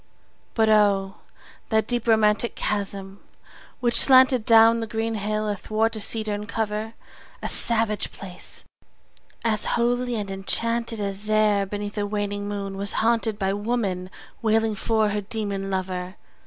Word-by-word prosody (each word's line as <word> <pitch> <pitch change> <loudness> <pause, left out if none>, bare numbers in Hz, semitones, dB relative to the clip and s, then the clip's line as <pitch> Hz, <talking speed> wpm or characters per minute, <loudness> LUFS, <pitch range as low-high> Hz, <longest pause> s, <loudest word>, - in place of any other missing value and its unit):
But 220 -1 +3
O, 200 -2 +3 0.5
that 220 -1 +2
deep 240 0 -2
romantic 220 +1 +3
chasm 200 -1 -4 0.6
which 235 -1 +3
slanted 260 -3 +6
Down 230 0 +6
the 225 - -3
green 225 +1 -2
hill 215 0 -2
athwart 215 +2 -1
a - - -4
cedarn 210 -1 -1
cover! 220 +1 -3 0.5
A - - -1
savage 225 -2 +1
place! 180 -2 -7 0.8
as 215 -2 +1
holy 245 +1 0
and 205 -3 -4
enchanted 230 +4 -1
As 200 +1 -2
e'er 210 -2 +3
beneath 205 +1 -5
a 205 - -1
waning 205 0 -3
moon 200 -1 -4
was 200 +1 -2
haunted 225 -1 +1
15 - - -25
By 195 - +1
woman 205 -4 -2 0.3
wailing 225 -1 +2
for 220 +1 +1
her 205 0 -2
demon 200 -2 -4
lover! 185 -1 -3
215 Hz, 140 wpm, -24 LUFS, 200-225 Hz, 0.8 s, slanted